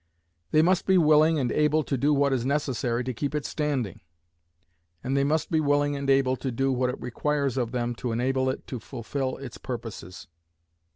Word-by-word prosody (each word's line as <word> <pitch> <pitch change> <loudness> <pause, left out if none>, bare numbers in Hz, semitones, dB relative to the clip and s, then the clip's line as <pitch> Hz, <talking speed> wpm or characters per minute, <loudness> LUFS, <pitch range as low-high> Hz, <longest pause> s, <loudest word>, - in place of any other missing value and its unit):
They 155 - +4
must 180 +1 +2
be 190 -1 +5
willing 155 -1 +5
and 125 -4 0
able 150 +1 +2
to 140 - -2
do 140 +4 +2
what 140 -1 +3
is 125 -3 0
necessary 130 -3 -1
to 130 +1 -3
keep 145 +5 -3
it 150 - -2
standing. 140 - -2 1.0
And 135 +2 -1
they 140 - +3
must 155 +5 0
be 160 - +3
willing 145 -1 +2
and 140 0 -3
able 135 -1 +3
to 130 - -3
do 135 +3 0
what 125 0 +1
it 125 - -5
requires 140 +2 -1
of 120 -3 -1
them 120 -1 -1
to 125 - -3
enable 130 +3 0
it 130 - -4
to 125 - -6
fulfill 130 +3 -4
its 130 -3 -9
purposes. 110 -7 -7
135 Hz, 195 wpm, -26 LUFS, 125-150 Hz, 1.0 s, be